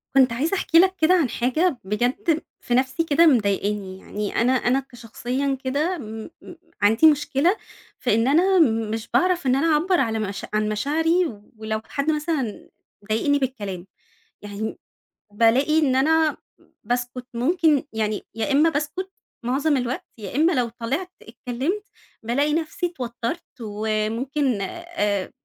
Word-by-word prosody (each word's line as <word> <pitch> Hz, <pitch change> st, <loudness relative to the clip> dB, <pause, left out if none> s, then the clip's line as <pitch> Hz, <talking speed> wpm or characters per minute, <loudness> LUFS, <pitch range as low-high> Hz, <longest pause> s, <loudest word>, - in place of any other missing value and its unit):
كنت 260 Hz, -3 st, +5 dB
عايزة 305 Hz, +11 st, 0 dB
أحكي 330 Hz, -2 st, +4 dB
لك 375 Hz, +1 st, +4 dB
كده 320 Hz, +3 st, +5 dB
عن 330 Hz, -8 st, +3 dB
حاجة 265 Hz, +7 st, +1 dB
بجد 255 Hz, -, 0 dB, 0.2 s
في 245 Hz, -, -3 dB
نَفْسي 260 Hz, +5 st, +1 dB
كده 325 Hz, +1 st, +4 dB
مضايقني، 205 Hz, -6 st, +1 dB
يعني 210 Hz, +1 st, -5 dB
أنا 245 Hz, +2 st, +3 dB
أنا 260 Hz, 0 st, +2 dB
كشخصيًا 255 Hz, +2 st, -3 dB
كده 300 Hz, +7 st, 0 dB
م 220 Hz, -2 st, -7 dB
م 350 Hz, -, -11 dB, 0.3 s
عندي 225 Hz, +9 st, +5 dB
مشكلة، 295 Hz, +6 st, +1 dB, 0.4 s
في 245 Hz, -4 st, +1 dB
إن 225 Hz, +3 st, +2 dB
أنا 360 Hz, +7 st, +4 dB, 0.3 s
مش 225 Hz, +1 st, -4 dB
باعرف 360 Hz, -5 st, +2 dB
إن 255 Hz, -, +4 dB
أنا 280 Hz, +5 st, +2 dB
أعبّر 345 Hz, +4 st, +2 dB
على 225 Hz, -3 st, 0 dB
مش 200 Hz, -2 st, -4 dB
عن 215 Hz, 0 st, +1 dB
مشاعري 320 Hz, -, +1 dB, 0.3 s
ولو 220 Hz, 0 st, -3 dB
حد 280 Hz, +2 st, -1 dB
مثلًا 300 Hz, -7 st, -2 dB, 0.4 s
ضايقني 285 Hz, +7 st, +2 dB
بالكلام، 205 Hz, -9 st, -4 dB, 0.5 s
يعني 205 Hz, +1 st, -5 dB, 0.6 s
بالاقي 250 Hz, +8 st, +3 dB
إن 275 Hz, -5 st, +2 dB
أنا 315 Hz, +3 st, +3 dB, 0.5 s
باسكُت 245 Hz, +2 st, -3 dB
ممكن 305 Hz, +2 st, +2 dB
يعني 215 Hz, -1 st, -2 dB
يا 225 Hz, +4 st, -1 dB
إمّا 300 Hz, +4 st, +5 dB
باسكُت 315 Hz, +6 st, -3 dB, 0.3 s
معظم 280 Hz, +4 st, +1 dB
الوقت، 250 Hz, 0 st, -3 dB
يا 210 Hz, 0 st, -7 dB
إمّا 320 Hz, +5 st, +4 dB
لو 245 Hz, -5 st, +1 dB
طلعت 260 Hz, +11 st, -4 dB
اتكلّمت، 275 Hz, -, -3 dB, 0.4 s
بالاقي 280 Hz, +6 st, +1 dB
نفْسي 325 Hz, +4 st, -1 dB
اتوتّرت 245 Hz, 0 st, -4 dB, 0.2 s
وممكن، 220 Hz, +4 st, -1 dB
آآ 205 Hz, -, -2 dB
260 Hz, 140 wpm, -23 LUFS, 225-315 Hz, 0.6 s, كنت